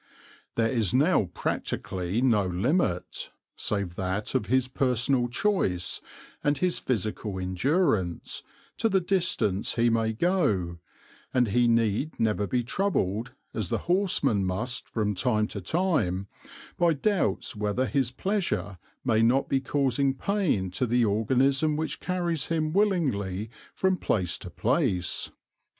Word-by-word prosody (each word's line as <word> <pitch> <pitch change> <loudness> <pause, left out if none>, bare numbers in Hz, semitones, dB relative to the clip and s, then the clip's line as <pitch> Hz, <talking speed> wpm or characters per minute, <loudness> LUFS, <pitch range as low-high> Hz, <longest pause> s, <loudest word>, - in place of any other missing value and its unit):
There 115 -1 +2
is 115 -5 +2
now 145 - +4
practically 95 +5 -2
no 105 -7 +3
limit, 90 - 0 0.3
save 100 -4 -2
that 95 +2 -2
of 105 - 0
his 130 +1 +2
personal 125 -1 +1
choice 120 - 0 0.4
and 145 0 +2
his 180 -1 +1
physical 110 -3 -2
endurance, 95 - 0 0.4
to 225 - +2
the 195 -2 +3
distance 175 - 0
he 115 0 +3
may 115 -1 +1
go, 110 - +1 0.6
and 125 -3 +3
he 120 +3 +3
need 115 +5 +1
never 105 -2 +1
be 125 +2 0
troubled, 120 - -1 0.2
as 105 -6 -2
the - - +1
horseman 175 - +2
must 105 +7 -2
be - - -27
from 105 -2 0
time 105 +2 +1
to 100 - -5
time, 100 - 0 0.5
by 170 -1 +4
doubts 155 - 0
whether 105 +5 0
his 135 -3 +1
pleasure 125 - -2 0.3
may 110 -3 +3
not 125 +4 +3
be 135 - +2
causing 135 0 +1
pain 145 - 0
to 125 +7 -1
the 120 +1 +3
organism 130 +8 +2
which 160 0 -2
carries 175 -4 -1
him 155 -2 0
willingly 115 - 0 0.2
from 190 -1 +2
place 90 - 0
to 90 - -8
place. 110 - 0
120 Hz, 135 wpm, -27 LUFS, 100-155 Hz, 0.6 s, now